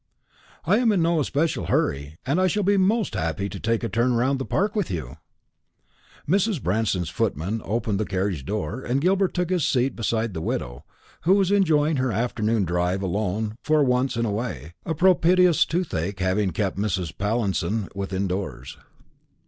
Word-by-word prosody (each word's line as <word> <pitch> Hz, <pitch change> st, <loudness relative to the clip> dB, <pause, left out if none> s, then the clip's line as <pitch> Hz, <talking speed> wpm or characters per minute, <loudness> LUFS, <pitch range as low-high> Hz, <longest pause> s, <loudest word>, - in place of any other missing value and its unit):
"I 210 Hz, -, +4 dB
am 240 Hz, -3 st, +3 dB
in 185 Hz, -5 st, +2 dB
no 165 Hz, -1 st, +2 dB
especial 150 Hz, +3 st, 0 dB
hurry, 70 Hz, +3 st, -1 dB
and 145 Hz, +8 st, +1 dB
I 185 Hz, -, +4 dB
shall 205 Hz, +4 st, 0 dB
be 200 Hz, +2 st, +3 dB
most 200 Hz, -, +2 dB
happy 80 Hz, +1 st, -2 dB
to 100 Hz, -, -7 dB
take 115 Hz, +1 st, 0 dB
a -, -, 0 dB
turn 120 Hz, +2 st, +1 dB
round 130 Hz, +3 st, +1 dB
the 135 Hz, -, -3 dB
Park 205 Hz, +3 st, 0 dB
with 205 Hz, -5 st, 0 dB
you." 70 Hz, -8 st, -5 dB, 1.1 s
Mrs. 195 Hz, +2 st, +2 dB
Branston's 95 Hz, -, -1 dB
footman 95 Hz, +9 st, -1 dB
opened 105 Hz, -2 st, -1 dB
the 110 Hz, -, 0 dB
carriage 95 Hz, -6 st, -2 dB
door, 105 Hz, -, -3 dB
and 130 Hz, +1 st, 0 dB
Gilbert 190 Hz, +4 st, +1 dB
took 180 Hz, 0 st, -1 dB
his 180 Hz, -4 st, +1 dB
seat 130 Hz, +1 st, +1 dB
opposite 115 Hz, -1 st, -1 dB
the 80 Hz, -, -4 dB
widow, -, -, -4 dB, 0.4 s
who 185 Hz, +4 st, +4 dB
was 195 Hz, -1 st, +2 dB
enjoying 160 Hz, -6 st, +3 dB
her 130 Hz, -1 st, 0 dB
afternoon 110 Hz, -1 st, 0 dB
drive 90 Hz, +3 st, 0 dB
alone 105 Hz, +3 st, -2 dB
for 155 Hz, -1 st, +3 dB
once 125 Hz, 0 st, +1 dB
in 115 Hz, -, +1 dB
a 110 Hz, -, -1 dB
way; 95 Hz, -, -4 dB
a 160 Hz, -, -1 dB
propitious 180 Hz, 0 st, +4 dB
toothache 100 Hz, -, -2 dB
having 95 Hz, +2 st, +1 dB
kept 95 Hz, +3 st, -2 dB
Mrs. 95 Hz, -6 st, -2 dB
Pallinson 105 Hz, 0 st, -1 dB
within 95 Hz, 0 st, -2 dB
doors. 90 Hz, -9 st, -5 dB
115 Hz, 175 wpm, -24 LUFS, -, 1.1 s, I